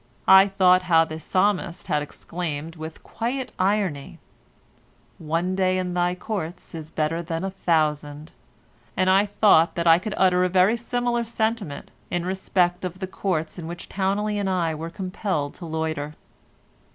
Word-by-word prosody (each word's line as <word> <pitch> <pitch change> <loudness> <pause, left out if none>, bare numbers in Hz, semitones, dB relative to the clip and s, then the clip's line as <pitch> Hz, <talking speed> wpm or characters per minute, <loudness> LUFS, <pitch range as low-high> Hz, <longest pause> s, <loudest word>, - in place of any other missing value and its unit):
I 190 +1 +8
thought 185 -2 +4
how 165 -3 +4
the 155 0 -7
Psalmist 185 0 0
had 150 - 0
exclaimed 160 +1 -5
with 160 0 -9
quiet 250 +3 -3
irony, 185 -7 0 1.0
"One 165 +3 -1
day 185 -1 +1
in 180 -1 -2
thy 175 0 +1
courts 180 -3 -5
is 160 -2 -7
better 160 +2 -1
than 165 0 -4
a 195 - -2
thousand," 155 -4 -1 0.7
and 185 0 +3
I 195 +2 +4
thought 200 -5 +4
that 170 - -1
I 165 0 +7
could 210 +3 -4
utter 180 -1 +4
a 185 - +2
very 185 +4 +4
similar 240 0 -1
sentiment 220 -8 -3 0.2
in 175 0 -2
respect 185 -1 0
of 180 0 -4
the 190 - -4
Courts 180 -4 -3
in 160 - -6
which 170 +1 -7
Towneley 205 +2 -1
and 200 -1 -1
I 170 -4 0
were 160 +2 -5
compelled 185 -4 -3
to 170 - -9
loiter. 155 -2 -3
180 Hz, 160 wpm, -24 LUFS, 160-195 Hz, 1.0 s, I